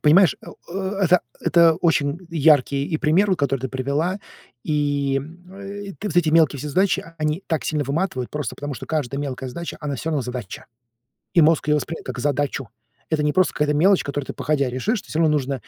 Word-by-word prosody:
понимаешь, 165 Hz, +2 st, +5 dB
э, -, -, -14 dB, 0.2 s
э 190 Hz, +2 st, -3 dB
это 180 Hz, 0 st, +5 dB, 0.2 s
это 170 Hz, -1 st, +5 dB
очень 160 Hz, -3 st, +1 dB
яркий, 145 Hz, -3 st, +3 dB
и, 160 Hz, -, -1 dB
пример 175 Hz, +6 st, +2 dB
от 185 Hz, -, +1 dB
который 135 Hz, -2 st, 0 dB
ты 130 Hz, -, -3 dB
привела. 140 Hz, +9 st, -1 dB, 0.5 s
И, 145 Hz, -2 st, 0 dB, 0.3 s
э, 200 Hz, +1 st, -8 dB
ты 210 Hz, -, -3 dB
вот 180 Hz, -, -5 dB
эти 175 Hz, -3 st, +4 dB
мелкие 155 Hz, -3 st, +4 dB
все 150 Hz, +3 st, -5 dB
задачи, 190 Hz, +7 st, +1 dB
они 155 Hz, +4 st, -1 dB
так 160 Hz, -2 st, -1 dB
сильно 150 Hz, -2 st, -1 dB
выматывают 140 Hz, -3 st, -2 dB
просто 150 Hz, -6 st, -4 dB
потому, 145 Hz, -1 st, -5 dB
что -, -, -8 dB
каждая 140 Hz, -3 st, -2 dB
мелкая 130 Hz, -2 st, -4 dB
задача, 170 Hz, +7 st, -6 dB
она 145 Hz, -2 st, -3 dB
всё 160 Hz, -, -3 dB
равно 150 Hz, -4 st, 0 dB
задача. 125 Hz, -5 st, -6 dB, 0.7 s
И 170 Hz, -, +6 dB
мозг 155 Hz, 0 st, +3 dB
ее 150 Hz, -, +4 dB
воспринимает 160 Hz, +2 st, -5 dB
как 130 Hz, -, -5 dB
задачу. 140 Hz, -1 st, -1 dB, 0.4 s
Это 155 Hz, -2 st, +1 dB
не 150 Hz, 0 st, +1 dB
просто 185 Hz, +3 st, +2 dB
какая-то 150 Hz, 0 st, +1 dB
мелочь, 185 Hz, +6 st, +4 dB
которую 140 Hz, -1 st, -4 dB
ты -, -, -5 dB
походя 140 Hz, -3 st, 0 dB
решишь, 185 Hz, -, -1 dB
ты -, -, -20 dB
всё 155 Hz, -, -3 dB
равно 160 Hz, -2 st, +4 dB
нужно, 140 Hz, -2 st, 0 dB
150 Hz, 205 wpm, -22 LUFS, 140-170 Hz, 0.7 s, И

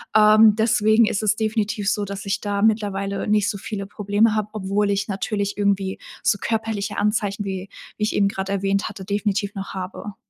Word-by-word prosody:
Ähm, 215 Hz, 0 st, +7 dB
deswegen 220 Hz, 0 st, +4 dB
ist 210 Hz, -, -1 dB
es 215 Hz, 0 st, +3 dB
definitiv 215 Hz, -2 st, -1 dB
so, 210 Hz, -, -1 dB
dass 200 Hz, 0 st, -6 dB
ich 195 Hz, +1 st, -1 dB
da 205 Hz, -1 st, -2 dB
mittlerweile 200 Hz, -3 st, 0 dB
nicht 210 Hz, -1 st, +2 dB
so 200 Hz, -, -3 dB
viele 200 Hz, 0 st, -5 dB
Probleme 205 Hz, +2 st, +1 dB
habe, 215 Hz, -1 st, -1 dB
obwohl 200 Hz, 0 st, 0 dB
ich 200 Hz, 0 st, 0 dB
natürlich 200 Hz, +1 st, -2 dB
irgendwie 200 Hz, -2 st, 0 dB, 0.2 s
so -, -, +3 dB
körperliche 220 Hz, -2 st, -2 dB
Anzeichen, 205 Hz, -1 st, 0 dB
wie 190 Hz, 0 st, -5 dB, 0.3 s
wie 215 Hz, -, -2 dB
ich 215 Hz, -, 0 dB
eben 200 Hz, -, +3 dB
grade 195 Hz, 0 st, -3 dB
erwähnt 195 Hz, 0 st, 0 dB
hatte, 190 Hz, -, -9 dB
definitiv 205 Hz, 0 st, -1 dB
noch 195 Hz, -1 st, -6 dB
habe. 190 Hz, +2 st, -6 dB
205 Hz, 185 wpm, -22 LUFS, 195-215 Hz, 0.3 s, Ähm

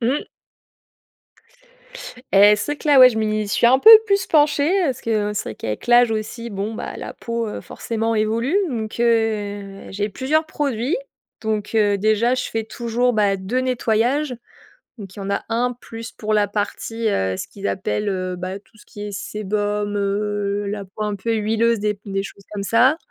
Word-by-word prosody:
Mmh. 250 Hz, +5 st, 0 dB, 2.1 s
Et 205 Hz, +1 st, +7 dB
c'est 290 Hz, -, -2 dB
vrai -, -, -5 dB
que -, -, -5 dB
là, 285 Hz, -2 st, +6 dB
ouais, 255 Hz, -1 st, +10 dB
je 220 Hz, -, -3 dB
m'y 215 Hz, -1 st, 0 dB
suis 205 Hz, +3 st, +2 dB
un 260 Hz, +2 st, +5 dB
peu 440 Hz, -, +8 dB, 0.2 s
plus 395 Hz, -1 st, +1 dB
penchée, 295 Hz, -1 st, +3 dB
heu, -, -, +2 dB
parce 265 Hz, -2 st, -2 dB
que 210 Hz, -2 st, -1 dB
c'est -, -, -2 dB
vrai -, -, -7 dB
qu'avec 105 Hz, 0 st, -5 dB
l'âge 240 Hz, 0 st, +5 dB
aussi, 225 Hz, +2 st, -4 dB
bon, 205 Hz, +2 st, -4 dB
bah, -, -, -6 dB
la -, -, -7 dB
peau 230 Hz, -1 st, -3 dB
heu, -, -, -5 dB
forcément 225 Hz, 0 st, -3 dB
évolue 225 Hz, -, 0 dB
donc 220 Hz, -5 st, -4 dB
heu, 205 Hz, -4 st, 0 dB
j'ai 205 Hz, +2 st, -2 dB
plusieurs 280 Hz, +9 st, 0 dB
produits 280 Hz, -, -1 dB, 0.5 s
donc 215 Hz, -2 st, -2 dB
heu, 205 Hz, -2 st, +3 dB
déjà, 220 Hz, +4 st, +2 dB
je 250 Hz, -, -2 dB
fais 225 Hz, -1 st, -2 dB
toujours 235 Hz, +2 st, -1 dB
bah, 205 Hz, -3 st, +2 dB
2 195 Hz, +6 st, -2 dB
nettoyages, 255 Hz, +2 st, 0 dB, 0.6 s
donc 195 Hz, -4 st, -10 dB
il -, -, -9 dB
y -, -, -5 dB
en 195 Hz, -, -5 dB
a 200 Hz, -, -1 dB
1 245 Hz, +2 st, 0 dB
plus 225 Hz, -1 st, -9 dB
pour 215 Hz, 0 st, -3 dB
la 210 Hz, -1 st, +3 dB
partie, 220 Hz, +2 st, -3 dB
heu, 95 Hz, -, 0 dB
ce -, -, -5 dB
qu'ils 200 Hz, 0 st, -6 dB
appellent, 205 Hz, +2 st, -2 dB
heu, 185 Hz, -1 st, -3 dB
bah, 185 Hz, +2 st, -5 dB
tout 220 Hz, -, -26 dB
ce -, -, -18 dB
qui 205 Hz, -, -11 dB
est -, -, -6 dB
sébum, 205 Hz, +1 st, -2 dB
heu, 205 Hz, 0 st, -1 dB
la 205 Hz, 0 st, -4 dB
peau 195 Hz, +3 st, -6 dB
un 210 Hz, -1 st, -2 dB
peu 225 Hz, +4 st, -2 dB
huileuse 225 Hz, 0 st, +1 dB
et 210 Hz, -, +2 dB
puis 200 Hz, 0 st, -11 dB
des 195 Hz, 0 st, -1 dB
choses 200 Hz, 0 st, -11 dB
comme 205 Hz, -1 st, -4 dB
ça 245 Hz, +8 st, +4 dB
215 Hz, 195 wpm, -21 LUFS, 205-235 Hz, 2.1 s, ouais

